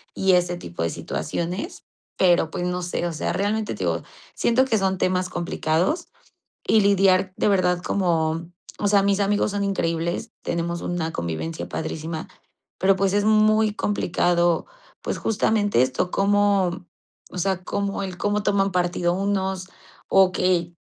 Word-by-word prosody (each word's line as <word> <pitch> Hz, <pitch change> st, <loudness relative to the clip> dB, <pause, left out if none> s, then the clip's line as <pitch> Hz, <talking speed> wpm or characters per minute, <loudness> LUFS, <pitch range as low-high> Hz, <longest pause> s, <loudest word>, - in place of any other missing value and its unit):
y 190 Hz, -1 st, +3 dB
ese 175 Hz, 0 st, +2 dB
tipo 85 Hz, -, -5 dB
de 85 Hz, -, 0 dB
situaciones, 170 Hz, -, -4 dB, 0.3 s
pero 175 Hz, -3 st, +3 dB
pues 175 Hz, -, -3 dB
no 180 Hz, 0 st, -2 dB
sé, 175 Hz, 0 st, -2 dB
o 170 Hz, -, -4 dB
sea, 155 Hz, -, -2 dB
realmente, 210 Hz, +2 st, -1 dB
te -, -, -15 dB
digo, -, -, -1 dB, 0.3 s
siento 235 Hz, +2 st, +3 dB
que 230 Hz, -4 st, +1 dB
son 190 Hz, -1 st, 0 dB
temas 185 Hz, 0 st, +1 dB
complicados 170 Hz, -, -1 dB, 0.6 s
y 220 Hz, -, +5 dB
lidiar 195 Hz, -2 st, +3 dB
de -, -, +1 dB
verdad 180 Hz, -3 st, +2 dB
como, 165 Hz, -3 st, 0 dB, 0.3 s
o 205 Hz, -, +1 dB
sea, 200 Hz, -1 st, +4 dB
mis 200 Hz, 0 st, +2 dB
amigos 205 Hz, +1 st, +1 dB
son 200 Hz, 0 st, -1 dB
increíbles, 170 Hz, +2 st, -2 dB
tenemos 170 Hz, 0 st, -2 dB
una 170 Hz, -2 st, -2 dB
convivencia 85 Hz, -, -4 dB
padrísima, 160 Hz, 0 st, -4 dB, 0.5 s
pero 190 Hz, +1 st, +4 dB
pues, 195 Hz, 0 st, +1 dB
es 205 Hz, 0 st, +2 dB
muy 215 Hz, 0 st, +4 dB
complicado, 175 Hz, -4 st, +1 dB, 0.4 s
pues, -, -, -3 dB
justamente 210 Hz, -, +1 dB
esto, 130 Hz, +7 st, -1 dB
cómo, 200 Hz, -3 st, +2 dB, 0.5 s
o -, -, -8 dB
sea, 185 Hz, 0 st, -1 dB
cómo 200 Hz, +2 st, -2 dB
el 185 Hz, -2 st, -6 dB
cómo 205 Hz, +3 st, 0 dB
toman 195 Hz, -1 st, +2 dB
partido 175 Hz, -1 st, +1 dB
unos 190 Hz, -1 st, -1 dB, 0.4 s
o 190 Hz, -1 st, +5 dB
que 175 Hz, -2 st, +1 dB
185 Hz, 150 wpm, -23 LUFS, 175-200 Hz, 0.6 s, y